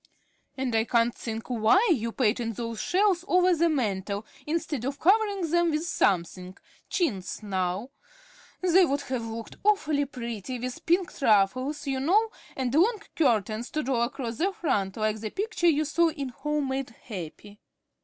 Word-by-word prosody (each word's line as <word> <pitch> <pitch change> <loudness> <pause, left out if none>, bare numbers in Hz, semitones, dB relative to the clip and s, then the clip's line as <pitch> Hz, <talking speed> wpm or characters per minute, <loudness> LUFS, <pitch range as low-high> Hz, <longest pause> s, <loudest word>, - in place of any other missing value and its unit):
"And 260 -2 -2
I 220 0 +3
can't 235 0 +2
think 225 -2 -6
why 245 - +3
you 230 -5 -2
painted 230 -1 0
those 230 -1 -4
shelves 375 -2 +2
over 365 -1 +4
the 335 +1 +3
mantel 205 - -1 0.2
instead 310 -5 -2
of 275 +2 -3
covering 400 -1 +3
them 345 0 +3
with 310 +1 -1
something, 185 - 0 0.3
chintz, 210 - -2
now. 190 +4 -2 0.7
They 370 +1 +5
would 285 -4 +1
have 260 -4 -3
looked 225 0 -7
awfully 310 -9 +2
pretty 240 -2 -5
with 250 +1 -6
pinked 350 -1 +1
ruffles, 255 +6 +2
you 270 -1 -1
know, 415 +11 +3 0.2
and 255 -2 -2
long 410 +7 +3
curtains 225 - +1
to 305 - -2
draw 255 -2 0
across 235 -1 -3
the 380 +4 +2
front 205 - -1
like 215 0 0
that 215 0 -6
picture 390 -3 +1
you 305 -1 +2
saw 335 +3 +3
in 280 -4 -5
'Home 295 +2 -2
made 265 0 -2
Happy.'" 205 -2 -9
265 Hz, 160 wpm, -27 LUFS, 225-335 Hz, 0.7 s, They